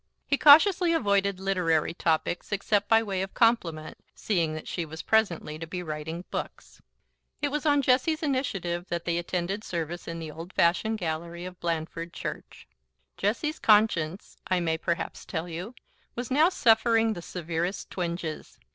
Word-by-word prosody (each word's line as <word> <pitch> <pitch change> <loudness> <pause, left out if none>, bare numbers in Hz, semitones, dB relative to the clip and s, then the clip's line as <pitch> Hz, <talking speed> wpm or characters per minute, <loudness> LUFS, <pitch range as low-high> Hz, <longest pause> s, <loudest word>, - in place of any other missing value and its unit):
He 280 - +2
cautiously 335 +5 +6
avoided 200 - +1
literary 180 -5 +1
topics, 165 +2 -1
except 205 0 0
by 225 0 +5
way 195 -3 -2
of 190 0 -5
compliment, 175 -10 +1 0.2
seeing 170 -7 0
that 155 - -7
she 175 - -2
was 160 0 -8
presently 175 -8 +1
to 165 - -6
be 180 +2 -5
writing 160 +2 -5
books. - - -6 0.6
It 290 - 0
was 300 +2 -2
on 290 -1 +4
Jessie's 310 +6 +2
initiative 195 - -2
that 170 -1 -3
they 170 0 0
attended 180 +4 -3
service 170 -1 -4
in 165 - -4
the 160 -2 -6
old 165 +4 -9
fashioned 180 +6 +2
gallery 170 0 -4
of 185 -1 -9
Blandford 165 0 -3
church. - - -7 0.5
Jessie's 240 +10 -1
conscience, 205 -5 +2
I 185 - +2
may 160 -2 -1
perhaps 170 +2 -3
tell 165 -1 -4
you, 180 +8 -6 0.4
was 245 0 -5
now 305 +6 +5
suffering 225 -6 +3
the 175 - -7
severest 170 +2 -4
twinges. 170 -3 -4
180 Hz, 155 wpm, -27 LUFS, 165-225 Hz, 0.6 s, cautiously